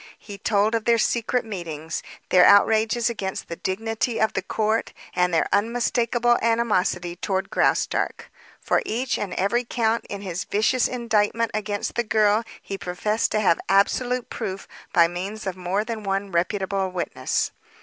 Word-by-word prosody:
He 200 -2 -10
told 210 +1 +2
of 225 -1 -1
their 235 0 +4
secret 235 +2 0
meetings, 165 -6 -5 0.3
their 180 -1 +6
outrages 220 +4 +5
against 200 -5 -4
the 170 - -4
dignity 225 +5 -2
of 220 - +2
the 195 - -1
court, 215 +3 -1 0.2
and 180 0 +2
their 165 - +2
unmistakable 240 +2 +2
animosity 200 -7 +1
toward 190 +1 -2
Graustark. - - 0 0.3
For - - +1
each 245 +3 -1
and 205 - -3
every 200 +6 +1
count 230 -1 0
in 200 -1 -5
his 185 -3 -4
vicious 220 +4 +2
indictment 230 -2 0
against 205 -1 -2
the 240 - 0
girl 215 0 +3 0.2
he 195 -1 -6
professed 210 +6 -1
to 215 - +2
have 175 -5 +3
absolute 245 +5 +2
proof 195 -4 -5 0.2
by 170 -1 +5
means 195 +5 -5
of 190 -2 -3
more 185 +3 -1
than 225 -1 -4
one 195 0 -2
reputable 190 +2 0
witness. 180 -1 -2
210 Hz, 155 wpm, -24 LUFS, 190-230 Hz, 0.3 s, their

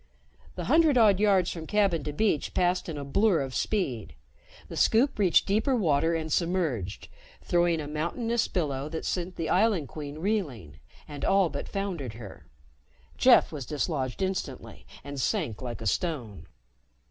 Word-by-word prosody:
The - - -4
hundred 315 -5 +4
odd 210 -5 +5
yards 195 -4 +3
from 160 -2 -7
cabin 195 -7 +1
to 150 - -2
beach 155 -1 0
passed 180 0 +1
in 155 - -5
a 140 - -5
blur 185 +3 +2
of 135 -1 -5
speed. 125 - -2 0.5
The - - -8
Scoop 235 +2 +2
reached 185 -5 +4
deeper 220 +7 +1
water 165 -5 +2
and 160 -2 -2
submerged, 165 - -1 0.4
throwing 175 -1 +2
a 150 - -5
mountainous 215 +10 -1
billow 145 -4 -2
that 160 0 -5
sent 180 0 -3
the 165 - -3
Island 190 - +2
Queen 145 -1 -7
reeling 150 - -3 0.3
and 145 -2 -8
all 195 -3 +3
but 140 - -6
foundered 180 - -4
her. 110 -4 -11 0.7
Jeff - - +5
was 140 -6 -6
dislodged 145 0 -2
instantly 185 -9 -5 0.2
and 140 -1 -5
sank 150 - -1
like 120 -2 -6
a - - -6
stone. 125 - -2
165 Hz, 160 wpm, -27 LUFS, 140-195 Hz, 0.7 s, odd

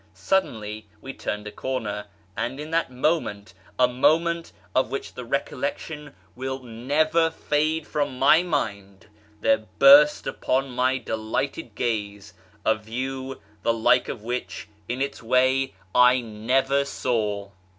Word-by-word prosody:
Suddenly 110 - -1
we 135 +4 -8
turned 105 -4 -4
a 105 - -6
corner, 105 -3 -3 0.3
and 130 +4 -3
in 150 +1 -7
that 165 -3 +1
moment 125 -8 -1
— - - -22
a 125 - +6
moment 165 +7 +2 0.2
of 130 -3 +2
which 135 +2 -5
the 125 - -7
recollection 140 +3 -4 0.2
will 130 +1 -3
never 145 +8 +1
fade 155 0 0
from 145 -3 -2
my 140 +5 +6
mind 100 - -3 0.2
— 105 0 -30
there 275 0 +2
burst 295 +2 +7
upon 135 +1 -1
my 130 +1 +1
delighted 115 +6 -3
gaze 105 -5 -3 0.3
a 110 - +5
view 130 +5 -5 0.2
the 115 - +2
like 115 +2 +3
of 105 - -6
which 120 -3 -4 0.2
(in 125 +3 0
its 140 - -5
way) 130 0 +2 0.2
I 125 +1 +6
never 125 +5 +1
saw. 105 -7 -2
130 Hz, 140 wpm, -25 LUFS, 110-145 Hz, 0.3 s, burst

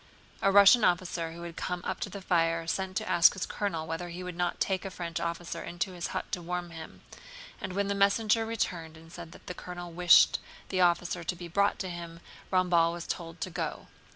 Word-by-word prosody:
A 195 - +4
Russian 200 +4 +8
officer 175 -3 +1
who 170 +1 -9
had 170 -1 -7
come 180 -1 -3
up - - -3
to - - -3
the 195 0 -8
fire 165 -2 +1
sent 185 +3 -2
to - - -2
ask 170 -1 +6
his 190 - -3
colonel 165 -6 -3
whether 165 +2 -4
he 175 +2 -7
would 180 -1 -6
not 175 0 -1
take 190 -1 0
a 195 - -4
French 170 -2 -5
officer 170 0 -4
into 175 +2 -3
his 175 -1 -4
hut - - -5
to 185 -4 -2
warm 175 0 -4
him, 160 -1 -10 0.6
and 185 - -4
when 200 +1 0
the 200 - 0
messenger 210 +3 +3
returned 175 -8 -3
and 165 +1 -15
said 170 -1 -9
that - - -15
the 180 - -5
colonel 175 -1 -8
wished 175 0 +6 0.3
the 185 -1 0
officer 175 0 +2
to 180 - -2
be 175 0 -8
brought 200 +4 +2
to 190 - -4
him, 170 -1 -8 0.3
Ramballe 175 -3 +3
was 175 0 -6
told 165 -1 -5
to 185 - -3
go. 165 -1 -4
175 Hz, 220 wpm, -29 LUFS, 170-185 Hz, 0.6 s, Russian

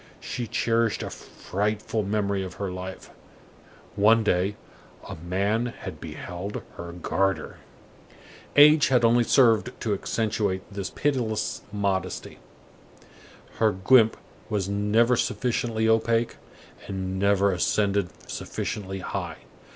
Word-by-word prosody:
She 120 -2 -4
cherished 115 0 +1
a - - -5
frightful 105 +2 -3
memory 100 -1 -1
of 95 -2 -7
her 100 -2 -3
life; 90 +1 -7 0.8
one 110 +3 +5
day, 95 0 +1 0.5
a - - -6
man 100 +8 0
had 95 -9 -8
beheld 90 +5 -6
her 85 0 -6
garter. 90 0 -1 1.0
Age 150 +1 +7
had 125 -3 +3
only 120 +1 +5
served 120 -1 +3
to 110 -4 0
accentuate 105 -2 -1
this 100 -1 -4
pitiless 120 -7 -1
modesty. 95 -3 -2 1.2
Her 110 -1 +4
guimpe 110 +4 +4 0.3
was 100 -4 -1
never 105 +4 +3
sufficiently 115 -1 0
opaque, 115 +1 +2 0.5
and 95 -1 -3
never 100 0 +3
ascended 100 +1 +1 0.2
sufficiently 95 -2 -4
high. - - -4
105 Hz, 110 wpm, -26 LUFS, 95-115 Hz, 1.2 s, Age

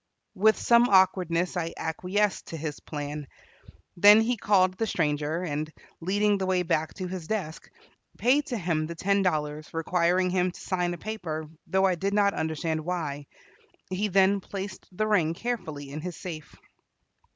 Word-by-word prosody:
With 215 +3 +4
some 235 +1 +4
awkwardness 185 -2 +3
I 165 -2 -3
acquiesced 185 +5 -1
to 165 - -6
his 155 -1 -5
plan. 145 -1 -6 0.7
Then 205 +4 +8
he 240 +2 +1
called 195 -4 +3
the 225 +3 -1
stranger, 155 0 -1
and, 155 -1 -3 0.3
leading 205 +3 +1
the 190 - -1
way 185 -1 +2
back 160 -2 -1
to 185 -2 -4
his 180 -3 -6
desk, 180 -7 -4 0.5
paid 280 +5 +3
to 245 - -2
him 165 -5 -1
the 170 - -6
ten 200 +4 +1
dollars, 155 -4 -1
requiring 180 +2 +1
him 185 0 +2
to 180 - -11
sign 180 -2 -1
a - - -11
paper, 165 -6 -5 0.2
though 190 +3 +2
I 190 - +3
did 195 +4 -1
not 200 -1 +3
understand 160 0 -2
why. 150 -5 -3 0.6
He 195 +3 0
then 195 +1 +4
placed 195 0 -7
the 215 +4 -1
ring 175 -7 +2
carefully 155 - -4
in 150 +2 -5
his 175 -1 -6
safe. 160 -4 -8
180 Hz, 165 wpm, -27 LUFS, 160-200 Hz, 0.7 s, Then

